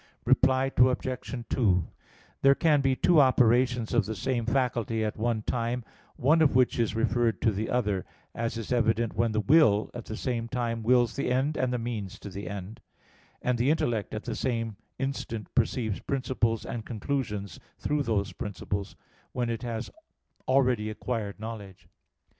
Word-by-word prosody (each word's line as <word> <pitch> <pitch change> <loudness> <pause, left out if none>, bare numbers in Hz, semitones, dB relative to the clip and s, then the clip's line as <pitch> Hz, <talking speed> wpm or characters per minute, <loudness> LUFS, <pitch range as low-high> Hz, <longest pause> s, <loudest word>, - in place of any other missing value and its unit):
Reply 130 +1 +3
Obj. 125 -1 +1
2: 95 -8 +2 0.5
There 135 0 +6
can 150 -3 +3
be 135 -1 +2
two 170 +4 +4
operations 125 -2 +3
of 115 -4 +2
the 110 - -3
same 120 +3 -1
faculty 115 -3 0
at 105 - -1
the - - -11
one 115 -2 0
time, 120 +1 -1 0.3
one 155 +6 +3
of 145 -5 +4
which 125 -1 +3
is 115 -1 +1
referred 115 0 +1
to 110 - +4
the 105 +2 -3
other; 105 -6 0 0.3
as 115 0 -3
is 115 0 -6
evident 115 -1 +1
when 115 +1 +1
the 110 - 0
will 110 -6 +4
at 120 -2 -7
the 110 - -6
same 120 -3 -2
time 115 -2 -2
wills 120 0 +3
the 140 -3 -1
end 135 +4 +1
and 130 -1 0
the 125 - 0
means 110 -4 -4
to 100 - -9
the 95 -1 -6
end; 100 +2 -7 0.6
and 125 -1 +1
the 125 +4 +3
intellect 120 -11 0
at 110 - -5
the - - -3
same 115 -3 -2 0.2
instant 125 -5 -4
perceives 115 -3 0
principles 125 -4 -1
and 115 -2 -5
conclusions 105 - -3 0.2
through 150 0 0
those 105 -6 -1
principles, 100 0 -4 0.4
when 120 -2 -1
it 115 - -3
has 115 -3 -4 0.6
already 125 -5 +2
acquired 110 -2 -4
knowledge. 105 -4 -8
115 Hz, 170 wpm, -28 LUFS, 110-130 Hz, 0.6 s, There